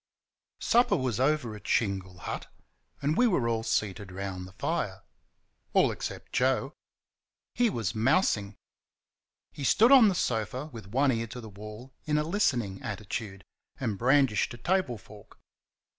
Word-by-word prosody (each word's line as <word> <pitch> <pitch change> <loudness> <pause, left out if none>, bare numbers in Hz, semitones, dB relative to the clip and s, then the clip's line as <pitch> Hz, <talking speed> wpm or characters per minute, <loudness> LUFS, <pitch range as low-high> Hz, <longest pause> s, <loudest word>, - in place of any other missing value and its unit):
Supper 240 +1 +4
was 125 -4 -1
over 130 -5 +1
at 105 - -11
Shingle 95 -4 0
Hut, - - -5 0.5
and 150 +2 +2
we 245 - +4
were 140 - +1
all 115 -1 0
seated 105 -3 -2
round 95 -1 -5
the - - -13
fire - - -2 0.7
all - - +4
except - - -6
Joe. 130 +2 +1 0.8
He 245 -1 +3
was 115 - -2
mousing. 110 - +2 1.0
He 145 - -8
stood 225 - +5
on 260 -5 +9
the 195 - +2
sofa 125 - -2
with 110 -4 -9
one 135 +6 +2
ear 115 -1 -1
to 125 +2 -8
the 110 -2 -9
wall 105 +5 -10
in 150 0 +1
a 150 - +2
listening 125 - 0
attitude, 105 -2 -5 0.3
and 105 - -1
brandished 130 -4 +3
a - - -12
table 175 -3 0
fork. 105 +1 -16
115 Hz, 150 wpm, -29 LUFS, 105-145 Hz, 1.0 s, on